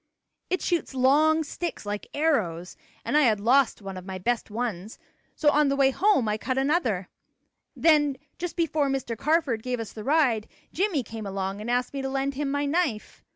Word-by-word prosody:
"It 370 - -1
shoots 335 -5 -1
long 305 +5 +4
sticks, 335 -3 -5
like 205 0 -4
arrows, 205 - 0 0.3
and - - -1
I 300 - +6
had 220 -7 +3
lost 240 0 +3
one 195 -1 -6
of 185 - -8
my 190 -1 -5
best 235 +6 -1
ones, 215 -3 -4 0.4
so 295 -2 +3
on 300 0 +3
the 275 - +1
way 270 -1 +4
home 370 - +2
I 210 0 -1
cut 255 +3 -2
another. 265 - +1 0.7
Then 295 -4 +3 0.2
just 350 0 -4
before 310 -4 +1
Mr. 265 -4 -2
Carford 285 -3 +1
gave 250 0 -3
us 225 - -5
the 215 - -8
ride, 260 -6 +2 0.3
Jimmie 355 -7 0
came 220 -2 -7
along 195 +1 -3
and 220 - -5
asked 245 +2 0
me 275 - -3
to 270 - -3
lend 270 +1 -1
him 280 +1 -2
my 285 +1 0
knife. 285 -7 -1
265 Hz, 195 wpm, -26 LUFS, 220-300 Hz, 0.7 s, I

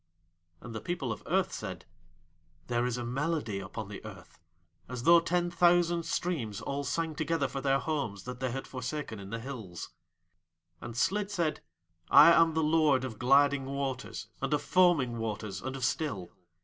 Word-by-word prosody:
And 120 - -8
the 110 - -5
People 145 -7 -3
of 110 - -5
Earth - - +1
said: - - -6 0.8
"There 120 0 0
is 125 -1 -2
a 120 - -4
melody 135 -4 -1
upon 100 +2 -6
the 100 -1 -9
Earth 95 -4 -12 0.5
as 125 -2 -5
though 170 +3 +8
ten 175 +1 0
thousand 175 -1 +3
streams 130 - -2
all 140 +1 -3
sang 160 +3 -1
together 160 -2 0
for 135 0 -5
their 135 0 +3
homes 135 - -3
that 125 0 -7
they 130 0 -1
had 135 +2 -4
forsaken 130 -3 -5
in 100 -1 -9
the 115 - -3
hills." 115 -8 -7 0.9
And 120 -1 -7
Slid 200 - +1
said: 170 -6 -1 0.5
"I 170 - +9
am 165 -1 +5
the 160 - +2
Lord 150 -4 +3
of 115 -5 -7
gliding 140 +1 +4
waters 135 -1 -4 0.2
and - - -1
of 145 - -3
foaming 160 -11 +3
waters 110 -2 -4
and 130 +1 -4
of 130 -3 -1
still. 105 - -2
135 Hz, 175 wpm, -30 LUFS, 115-160 Hz, 0.9 s, I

